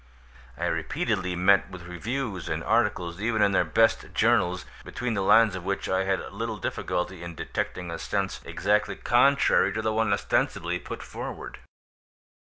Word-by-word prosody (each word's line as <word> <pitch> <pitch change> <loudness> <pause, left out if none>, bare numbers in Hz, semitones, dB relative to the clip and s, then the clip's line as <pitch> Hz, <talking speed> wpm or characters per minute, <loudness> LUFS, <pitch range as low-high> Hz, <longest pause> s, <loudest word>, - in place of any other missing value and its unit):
I - - -2
repeatedly 90 -1 -1
met 95 +2 +4
with 95 -2 -9
reviews 100 - -4
and - - -2
articles 100 -6 0
even 110 0 +2
in 100 - +4
their 95 - +3
best 110 +8 +1
journals, 90 +1 +2 0.2
between 125 -1 -3
the 100 - -1
lines 110 +2 +5
of 95 - -6
which 100 +1 -2
I 95 0 +1
had 95 0 -2
little 115 -1 -3
difficulty 90 0 -3
in 85 -1 -7
detecting 90 +2 -4
a 85 - -5
sense - - -2
exactly 105 +3 0
contrary 140 +4 +3
to 110 - -2
the 110 0 0
one 110 -1 +1
ostensibly 100 - 0
put - - -7
forward. - - -7
100 Hz, 160 wpm, -26 LUFS, 90-110 Hz, 0.2 s, lines